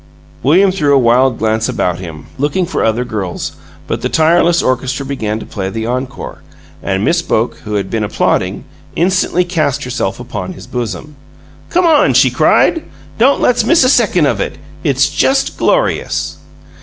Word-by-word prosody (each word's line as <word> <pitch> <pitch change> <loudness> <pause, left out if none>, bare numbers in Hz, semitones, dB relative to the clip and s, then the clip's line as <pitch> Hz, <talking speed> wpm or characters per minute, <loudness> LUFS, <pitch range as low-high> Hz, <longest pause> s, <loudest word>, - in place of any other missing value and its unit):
William 185 +9 +4
threw 150 -6 +2
a - - +6
wild 125 0 +3
glance 110 +2 0
about 90 -8 -1
him, 80 -5 -9
looking 150 +6 0
for 175 - -2
other 115 +2 0
girls, 100 -7 -4 0.3
but - - -3
the - - -1
tireless 170 +1 +3
orchestra 130 +2 -1
began 110 -6 -3
to - - -8
play 95 -2 -4
the 110 +2 -4
encore, 130 +3 -5 0.4
and 95 +1 -1
Miss 170 0 +2
Boke, 115 -7 -1
who 105 -1 -3
had 100 -2 -2
been 110 -2 -1
applauding, 105 - -1 0.3
instantly 180 0 +1
cast 155 -6 -1
herself 125 -6 -3
upon 105 -7 -6
his 95 - -11
bosom. 125 +3 -5 0.5
"Come 360 +1 +2
on!" 320 -3 +4
she - - +5
cried. 330 - +3 0.4
"Don't 270 +5 +4
let's 245 -2 +3
miss 320 +6 +4
a 255 - +4
second 210 - +3
of 140 - 0
it; - - -4 0.3
It's 135 -3 +2
just 265 - +1
glorious!" - - 0
135 Hz, 170 wpm, -15 LUFS, 110-175 Hz, 0.5 s, a